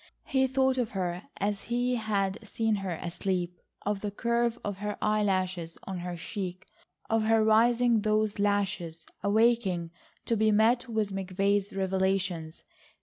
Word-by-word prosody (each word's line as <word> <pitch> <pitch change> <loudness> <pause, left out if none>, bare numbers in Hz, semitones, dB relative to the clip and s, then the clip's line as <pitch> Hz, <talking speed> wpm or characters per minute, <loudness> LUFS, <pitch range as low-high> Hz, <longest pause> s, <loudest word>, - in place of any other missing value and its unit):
He 265 -1 +2
thought 265 0 +2
of 240 -3 0
her 180 0 -3
as 205 0 -2
he 245 +1 0
had 205 -4 0
seen 220 0 0
her 190 -3 -3
asleep, 180 0 -2 0.3
of 205 -1 -1
the 210 - -2
curve 235 +3 0
of 205 -2 -3
her 210 0 -3
eye 215 0 +2
lashes 185 -4 -1
on 190 -2 -5
her 175 0 -5
cheek, 185 +1 -5 0.4
of 225 -1 +1
her 225 0 +4
raising 230 +1 +4
those 215 -1 +1
lashes, 195 -5 -1 0.2
awaking 200 -5 +2 0.3
to 230 - +1
be 215 0 +3
met 235 +4 +3
with 215 -3 0
McVay's 195 +2 0
revelations. 190 -4 -1
205 Hz, 145 wpm, -29 LUFS, 190-225 Hz, 0.4 s, her